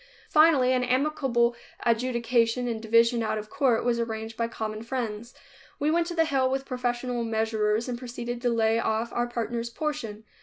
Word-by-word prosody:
Finally 300 -5 +5
an 250 -1 +1
amicable 255 -2 +1 0.3
adjudication 235 0 +1
and 225 -2 -3
division 230 +1 +3
out 220 -1 -1
of 215 0 -7
court 245 -5 +2
was 240 -1 +1
arranged 225 -1 -4
by 230 0 -1
common 215 -2 -5
friends. 235 -1 -4 0.4
We 295 +2 +1
went 335 +1 +2
to 345 - -5
the 325 -1 +3
hill 270 -4 +1
with 270 +1 -2
professional 245 -1 -2
measurers 220 0 0
and 245 -1 -4
proceeded 240 -1 -5
to 245 - +1
lay 225 -1 +2
off 225 +1 -1
our 240 0 0
partner's 235 0 -3
portion. 235 -7 -4
235 Hz, 175 wpm, -27 LUFS, 225-255 Hz, 0.4 s, Finally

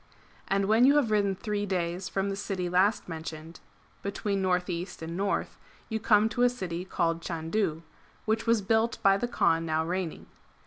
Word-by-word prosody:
And 195 0 +1
when 220 +4 +4
you 280 +3 +6
have 270 -7 +3
ridden 200 -2 +2
three 205 0 -3
days 180 0 -2
from 195 0 -1
the - - -2
city 195 -3 -3
last 185 +4 +2
mentioned, 160 0 -7 0.4
between 200 0 -2
north 180 -1 +1
east 175 -1 -5
and 165 +1 -5
north, 200 +2 -2 0.3
you 220 -1 -1
come 215 -1 +4
to 225 +2 -2
a 245 - +6
city 180 -8 -4
called 170 -3 -1
Chandu,^ 165 0 -2 0.4
which 220 +1 0
was 230 -3 +3
built 225 +3 +2
by 195 0 +6
the 240 +5 -1
Kaan 165 -8 +2
now 160 0 0
reigning. 180 -1 -3
195 Hz, 180 wpm, -28 LUFS, 170-215 Hz, 0.4 s, you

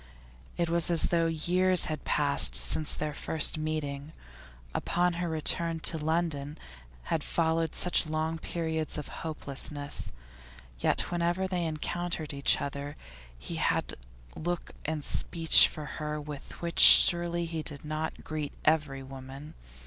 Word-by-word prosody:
It 170 - 0
was 170 0 +2
as 170 -2 +2
though 165 -1 +2
years 180 +3 +2
had 155 -1 -4
passed 140 - +4
since 65 - +3
their 150 0 -4
first 155 +1 +1
meeting. 155 -1 -4 0.6
Upon 175 0 0
her 175 - -2
return 165 +1 0
to 160 - -1
London 155 -2 -2 0.6
had 155 - -1
followed 165 -1 0
such 180 -2 +2
long 160 +1 -2
periods 160 -1 -3
of 150 - -6
hopelessness. 145 -2 -4 0.7
Yet - - 0
whenever 175 +2 0
they 180 -2 -2
encountered 160 0 -4
each 140 0 +2
other 140 +1 -6 0.4
he - - -7
had - - -1 0.4
look 175 +2 -4
and 155 -1 -3
speech 165 +2 +5
for 150 - -8
her 150 0 -5
with 145 +2 -9
which 170 0 -3
surely 170 -1 +7
he 165 -1 -4
did 145 -1 -7
not 155 +1 -4
greet 155 -2 -5
every 150 -4 +1
woman. 135 +2 -10
155 Hz, 135 wpm, -29 LUFS, 150-170 Hz, 0.7 s, surely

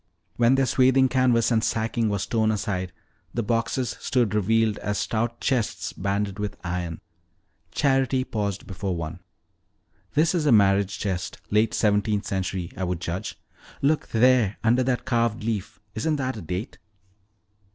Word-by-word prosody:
When 120 +2 +4
their 135 0 +3
swathing 130 +1 +4
canvas 125 -3 +3
and 110 -1 +2
sacking 115 0 0
was 100 -2 -1
thrown 110 -2 +1
aside, 100 -4 -2 0.4
the 120 - 0
boxes 115 +2 -1
stood 120 -6 +1
revealed 110 +1 +2
as 105 0 -2
stout 115 +1 -1
chests 125 -6 -1
banded 100 +1 -2
with 105 -1 -3
iron. 85 -2 -3 0.7
Charity 135 - +1
paused 100 -5 -3
before 95 -1 -3
one. 85 +1 -5 1.0
"This 160 +3 +3
is 160 -4 0
a - - +5
marriage 100 -2 +4
chest, 95 -3 -3
late 105 +1 +2
seventeenth 105 -1 +1
century, 95 -2 -3
I 95 - -4
would 90 -1 -2
judge. 90 +1 -4 0.4
Look 150 +2 +2
there, 115 -3 +3
under 120 +3 +4
that 125 -1 0
carved 115 -3 0
leaf 110 -3 -3
isn't 155 +8 0
that 130 -2 -2
a 110 - -7
date?" 90 - -5
110 Hz, 150 wpm, -25 LUFS, 100-125 Hz, 1.0 s, a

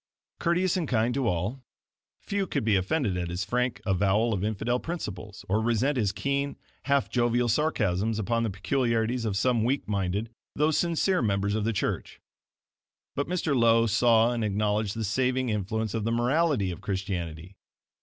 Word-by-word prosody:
Courteous 175 +2 +1
and 170 -4 -1
kind 120 -1 +1
to 135 -2 0
all, 100 +8 -1 0.6
few 200 -1 -2
could 140 -6 -1
be 110 -3 +3
offended 100 - 0
at 90 -1 -2
his 90 +1 -3
frank 125 +2 -1
avowal 100 +4 +2
of 100 -2 -2
infidel 110 +4 0
principles, 105 - -6
or 105 +3 +1
resent 120 +5 +1
his 105 -6 +1
keen, 140 +3 -2 0.3
half 140 -1 +2
jovial 120 0 +1
sarcasms 110 - +1
upon 115 +2 0
the 115 - 0
peculiarities 115 +4 0
of 100 -3 -1
some 120 +1 +2
weak 130 +2 0
minded, 100 +2 -1 0.2
though 150 +2 +2
sincere 170 +4 +1
members 100 -2 0
of 105 -1 -1
the 115 - +1
church. 105 - -3 1.0
But 140 - -1
Mr. 170 -5 0
Lowe 115 -1 +4
saw 115 +1 +4
and 115 -2 -2
acknowledged 105 0 0
the 115 - -3
saving 130 +4 0
influence 110 +1 -2
of 115 - -2
the 115 - 0
MORALITY 125 - +1
of 85 - -8
Christianity. 95 -3 -4
115 Hz, 165 wpm, -27 LUFS, 100-130 Hz, 1.0 s, Lowe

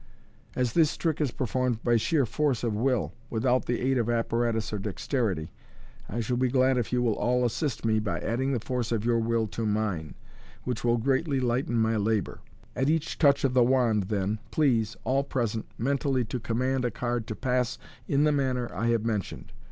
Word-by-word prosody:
As 125 -2 0
this 160 -3 +3
trick 160 -2 -1
is 145 - +2
performed 125 -2 -1
by 120 -1 +3
sheer 140 +5 +2
force 140 0 0
of 115 -3 0
will, 125 +2 0 0.2
without 125 +3 +1
the 120 - 0
aid 130 0 +2
of 115 0 0
apparatus 115 -1 0
or 105 - -1
dexterity, 100 - -2 0.6
I 120 +4 -2
shall 120 +2 -1
be 130 +1 +2
glad 130 0 +3
if 120 - -3
you 125 0 +1
will 115 -3 +2
all 125 +3 +1
assist 120 +1 -2
me 110 -1 +3
by 105 -2 -2
adding 130 +4 -1
the 125 - 0
force 120 0 -3
of 115 -2 -1
your 120 -1 +3
will 115 0 +1
to 115 - -4
mine, 105 -8 -1 0.5
which 125 -3 -3
will 120 0 +3
greatly 135 +4 +1
lighten 120 -1 0
my 110 0 +2
labour. 110 0 -1 0.4
At 135 +2 +1
each 160 0 -1
touch 140 -2 +4
of 135 -2 +2
the 125 -1 +5
wand, 120 -5 +2
then, 105 0 -1
please, 115 -7 +1
all 135 +2 +1
present, 115 -5 -2
mentally 135 0 0
to 120 +3 -4
command 125 +3 -1
a 120 - +1
card 120 0 -3
to 110 - -4
pass 125 0 0 0.3
in 140 +1 +2
the 150 - +4
manner 130 -4 -1
I 105 +6 -1
have 115 -1 +1
mentioned. 105 -5 -3
120 Hz, 200 wpm, -27 LUFS, 110-130 Hz, 0.6 s, the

